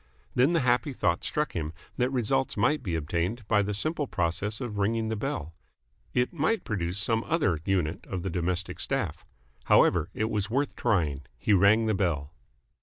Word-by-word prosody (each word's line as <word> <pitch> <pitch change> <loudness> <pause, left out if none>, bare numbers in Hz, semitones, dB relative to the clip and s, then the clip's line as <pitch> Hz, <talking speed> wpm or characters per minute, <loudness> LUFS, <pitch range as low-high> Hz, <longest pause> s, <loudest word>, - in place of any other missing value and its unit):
Then 130 +7 +3
the 165 - +3
happy 125 +3 +2
thought 85 -7 0
struck 150 0 -1
him 80 -2 -3 0.2
that 125 0 +2
results 130 0 0
might 145 +9 +2
be 85 -5 -2
obtained 85 +8 -2
by 105 -2 +4
the 100 0 -2
simple 155 +6 +1
process 100 +4 -1
of 115 -5 -4
ringing 110 +2 +1
the 110 - -1
bell. 100 - -4 0.6
It 125 +5 +1
might 170 +8 +1
produce 90 -3 -2
some 110 +2 +1
other 125 - +1
unit 90 -5 -1
of 90 -2 -4
the 95 - -2
domestic 90 +1 -2
staff. - - -2 0.4
However, 85 0 +4
it 110 +1 -1
was 105 -1 -1
worth 140 +5 0
trying. 75 - 0
He 105 - +1
rang 100 +4 +5
the 110 - +1
bell. 80 -7 -1
105 Hz, 180 wpm, -28 LUFS, 85-125 Hz, 0.6 s, rang